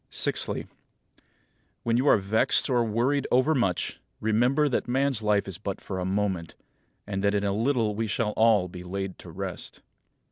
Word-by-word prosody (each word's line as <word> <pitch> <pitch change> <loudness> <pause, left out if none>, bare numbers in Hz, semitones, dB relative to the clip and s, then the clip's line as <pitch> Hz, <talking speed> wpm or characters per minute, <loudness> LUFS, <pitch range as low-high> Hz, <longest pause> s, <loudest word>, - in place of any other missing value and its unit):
Sixthly: - - +1 1.2
When 115 0 +1
you 130 +4 +1
are - - +6
vexed 105 +6 +2
or 120 -2 +3
worried 120 +6 0
overmuch, 125 - +1 0.2
remember 125 +7 +2
that 130 - -1
man's 135 -1 +1
life 105 -2 +1
is 95 -2 -6
but 100 -2 -4
for 95 -2 -5
a 90 - -2
moment, 95 -4 -2 0.5
and 100 -1 -3
that 100 0 +2
in 100 - 0
a 100 -1 0
little 115 -1 +1
we 110 +2 -2
shall 105 +1 -1
all 110 -4 +3
be 90 0 -9
laid 95 +1 -5
to - - -11
rest. - - -6
105 Hz, 170 wpm, -27 LUFS, 100-120 Hz, 1.2 s, are